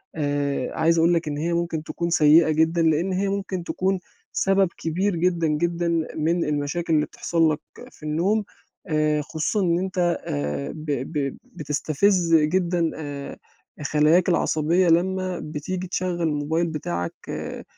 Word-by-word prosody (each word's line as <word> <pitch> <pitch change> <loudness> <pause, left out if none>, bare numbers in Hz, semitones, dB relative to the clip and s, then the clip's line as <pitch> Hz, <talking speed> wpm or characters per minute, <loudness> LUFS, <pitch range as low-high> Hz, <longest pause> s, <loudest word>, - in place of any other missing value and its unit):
آآ، 145 -3 -1
عايز 165 +1 +3
أقول 165 +2 +4
لك 165 -1 0
إن 145 -1 -2
هي 165 +3 -1
ممكن 170 -2 -1
تكون 170 +1 -3
سيئة 155 0 +5
جدًا، 160 +2 +2
لأن 165 +4 +2
هي 195 +2 0
ممكن 195 -2 -3
تكون، 190 +2 -1 0.3
سبب 195 0 +3
كبير 180 +4 -1
جدًا، 170 -1 +1
جدًا 170 +3 0 0.3
من 165 +2 +1
المشاكل 150 +3 -1
اللي 150 - +3
بتحصل 165 -2 +1
لك 150 - -2 0.3
في - - -19
النوم، 175 +8 +1 0.4
آآ، 155 -2 +1
خصوصًا 160 +7 -1
إن 170 -2 +2
أنت 190 0 -4 0.3
آآ، 70 -1 -3
ب 155 0 -8 0.3
ب 140 -3 -2
بتستفز 165 +4 +1
جدًا 170 +1 +2
آآ، 145 -2 -6 0.5
خلاياك 155 +5 +3
العصبية 170 +1 +2
لمّا 185 +2 +1
بتيجي 180 +5 -4
تشغّل 180 -1 -2
الموبايل 160 +1 0
بتاعك 90 - -3 0.2
آآ، - - -5
165 Hz, 145 wpm, -24 LUFS, 150-175 Hz, 0.5 s, سيئة